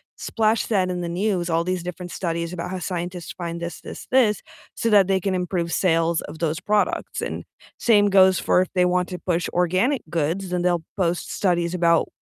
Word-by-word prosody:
splash 220 Hz, 0 st, 0 dB
that 190 Hz, -4 st, +1 dB
in 180 Hz, -1 st, -3 dB
the 170 Hz, -, -3 dB
news, 180 Hz, -1 st, -1 dB
all 165 Hz, 0 st, +1 dB
these 185 Hz, 0 st, -2 dB
different 180 Hz, 0 st, -7 dB
studies 170 Hz, -1 st, -3 dB
about 170 Hz, 0 st, -4 dB
how 185 Hz, -, -4 dB
scientists 175 Hz, -1 st, -5 dB
find 170 Hz, -2 st, -5 dB
this, 170 Hz, -1 st, -6 dB
this, -, -, -9 dB
this, 235 Hz, -6 st, +3 dB, 0.3 s
so -, -, -2 dB
that 200 Hz, -3 st, +6 dB
they 195 Hz, -1 st, +2 dB
can 190 Hz, +1 st, -1 dB
improve 180 Hz, -2 st, -2 dB
sales 165 Hz, -2 st, +2 dB
of 150 Hz, +2 st, -9 dB
those 160 Hz, -1 st, -1 dB
products, 210 Hz, 0 st, 0 dB
and -, -, -4 dB, 0.4 s
same 205 Hz, -3 st, +4 dB
goes 190 Hz, -1 st, +6 dB
for 180 Hz, -, +3 dB
if 185 Hz, -, 0 dB
they 180 Hz, -1 st, +4 dB
want 180 Hz, 0 st, +1 dB
to 180 Hz, -, -5 dB
push 175 Hz, 0 st, -1 dB
organic 185 Hz, -, +1 dB
goods, 170 Hz, +4 st, -1 dB
then 180 Hz, -1 st, 0 dB
they'll 175 Hz, -2 st, +1 dB
post 175 Hz, -3 st, -1 dB
studies 175 Hz, -3 st, 0 dB
about 170 Hz, -2 st, +3 dB
180 Hz, 200 wpm, -23 LUFS, 170-190 Hz, 0.4 s, that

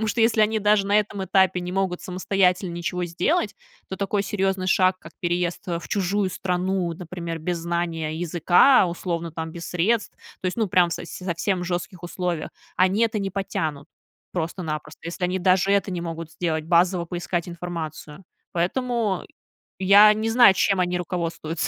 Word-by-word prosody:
Потому 220 Hz, -, 0 dB
что, 225 Hz, +2 st, +1 dB
если 225 Hz, -1 st, +3 dB
они 215 Hz, +1 st, +3 dB
даже 210 Hz, -1 st, +3 dB
на 205 Hz, +1 st, +4 dB
этом 210 Hz, -1 st, -2 dB
этапе 190 Hz, -1 st, +3 dB
не 180 Hz, 0 st, -5 dB
могут 185 Hz, -1 st, -1 dB
самостоятельно 185 Hz, 0 st, +1 dB
ничего 180 Hz, +1 st, -3 dB
сделать, 205 Hz, -, 0 dB, 0.4 s
то 190 Hz, -, -4 dB
такой 200 Hz, +1 st, 0 dB
серьёзный 195 Hz, -2 st, -1 dB
шаг, 185 Hz, 0 st, +3 dB
как 165 Hz, -, -12 dB
переезд, 175 Hz, +2 st, -2 dB
э, 170 Hz, -1 st, -1 dB
в 170 Hz, -, -10 dB
чужую 195 Hz, 0 st, 0 dB
страну, 180 Hz, -1 st, -1 dB
например, 170 Hz, -1 st, -6 dB
без 170 Hz, +2 st, -2 dB
знания 165 Hz, -2 st, -2 dB
языка, 175 Hz, -, +4 dB
условно, 170 Hz, -1 st, -3 dB
там 160 Hz, 0 st, -5 dB
без 170 Hz, 0 st, -7 dB
средств, 210 Hz, +6 st, 0 dB, 0.2 s
то -, -, -3 dB
есть, 185 Hz, -, -2 dB
ну, 225 Hz, -2 st, +1 dB
прям 180 Hz, -2 st, +3 dB
со 165 Hz, -, -4 dB
совсем 180 Hz, +2 st, -2 dB
в -, -, -3 dB
жёстких 180 Hz, +1 st, -4 dB
условиях, 175 Hz, -1 st, -3 dB, 0.3 s
они 190 Hz, +4 st, +3 dB
это 225 Hz, -1 st, +1 dB
не 195 Hz, -1 st, -2 dB
потянут 160 Hz, -7 st, -3 dB, 0.5 s
просто-напросто. 160 Hz, -3 st, -4 dB
Если 170 Hz, +2 st, -4 dB
они 180 Hz, +1 st, 0 dB
даже 185 Hz, +1 st, +3 dB
это 200 Hz, 0 st, +1 dB
не 180 Hz, -2 st, -3 dB
могут 165 Hz, -1 st, -6 dB
сделать, 160 Hz, -2 st, -2 dB
базово 175 Hz, +1 st, +3 dB
поискать 175 Hz, 0 st, -3 dB
информацию. 170 Hz, -1 st, -7 dB, 0.3 s
Поэтому 220 Hz, +3 st, 0 dB, 0.6 s
я 200 Hz, +3 st, +7 dB
не 220 Hz, +1 st, -2 dB
знаю, 230 Hz, -3 st, +7 dB
чем 195 Hz, 0 st, +2 dB
они 180 Hz, 0 st, 0 dB
руководствуются. 170 Hz, -2 st, -3 dB
180 Hz, 170 wpm, -24 LUFS, 170-195 Hz, 0.6 s, я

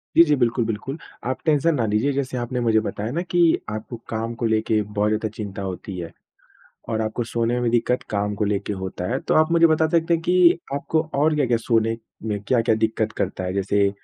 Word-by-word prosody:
जी, 170 Hz, -, +9 dB
जी, 150 Hz, -3 st, +3 dB
बिल्कुल, 120 Hz, -2 st, +1 dB
बिल्कुल, 115 Hz, +6 st, -4 dB, 0.3 s
आप 130 Hz, +1 st, -1 dB
टेंशन 155 Hz, +1 st, +3 dB
ना 120 Hz, -5 st, 0 dB
लीजिए। 110 Hz, +6 st, +1 dB
जैसे 135 Hz, -2 st, -2 dB
आपने 125 Hz, +1 st, -2 dB
मुझे 115 Hz, -2 st, +3 dB
बताया 110 Hz, 0 st, -4 dB
ना 165 Hz, +6 st, -1 dB
कि 175 Hz, 0 st, 0 dB, 0.3 s
आपको 110 Hz, +3 st, -6 dB
काम 115 Hz, +1 st, -3 dB
को 120 Hz, -, -3 dB
लेके 110 Hz, -1 st, +1 dB
बहुत 105 Hz, 0 st, -1 dB
ज़्यादा 110 Hz, 0 st, -1 dB
चिंता 100 Hz, -2 st, -6 dB
होती 95 Hz, 0 st, -5 dB
है 85 Hz, -2 st, -6 dB, 0.8 s
और 110 Hz, -1 st, 0 dB
आपको 110 Hz, +2 st, -2 dB
सोने 115 Hz, 0 st, -1 dB
में 125 Hz, 0 st, 0 dB
भी 120 Hz, -, +2 dB
दिक्कत 120 Hz, +1 st, +1 dB
काम 105 Hz, 0 st, -1 dB
को 105 Hz, -, 0 dB
लेके 100 Hz, 0 st, -1 dB
होता 95 Hz, -2 st, -5 dB
है, 130 Hz, -, 0 dB
तो -, -, -1 dB
आप 155 Hz, +1 st, +4 dB
मुझे 170 Hz, 0 st, +6 dB
बता 160 Hz, 0 st, +3 dB
सकते 165 Hz, +1 st, +2 dB
हैं 165 Hz, -, +1 dB
कि 180 Hz, -1 st, +5 dB
आपको 155 Hz, +3 st, 0 dB
और 150 Hz, +2 st, +3 dB
क्या-क्या 125 Hz, -5 st, +2 dB
सोने 115 Hz, -1 st, +1 dB, 0.3 s
में 105 Hz, -2 st, -1 dB
क्या-क्या 115 Hz, -3 st, +3 dB
दिक्कत 110 Hz, 0 st, 0 dB
करता 95 Hz, -1 st, -2 dB
है? 90 Hz, 0 st, -2 dB
जैसे 100 Hz, +1 st, +2 dB
115 Hz, 220 wpm, -23 LUFS, 105-140 Hz, 0.8 s, जी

